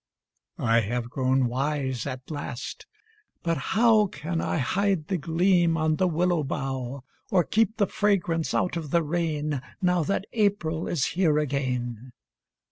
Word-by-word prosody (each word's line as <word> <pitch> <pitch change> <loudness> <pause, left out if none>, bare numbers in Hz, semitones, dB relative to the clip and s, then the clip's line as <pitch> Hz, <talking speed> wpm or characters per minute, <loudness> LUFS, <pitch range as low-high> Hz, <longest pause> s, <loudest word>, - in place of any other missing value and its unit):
I 115 -1 +3
have 120 +2 -2
grown 130 0 +2
wise 130 0 -1
at 130 +3 -6
last 145 -4 -6 0.6
but 165 -1 0 0.2
how 220 -2 +5
Can 165 +1 -4
I - - -1
hide 185 +3 0
the 190 - +1
gleam 170 +2 +2
on 155 -1 +1
the 185 - +2
willow 175 0 +1
bough, 135 -1 -4 0.3
Or 180 -3 +4
keep 220 +4 +1
the 205 - +3
fragrance 180 -5 0
out 180 - +1
of 160 -3 -4
the 170 +3 +2
rain 150 -3 -1 0.2
Now 180 -1 +2
that 195 +5 -1
April 195 -7 0
is 150 -7 0
here 165 -4 +3
again? 125 -4 -2
155 Hz, 145 wpm, -26 LUFS, 135-180 Hz, 0.6 s, how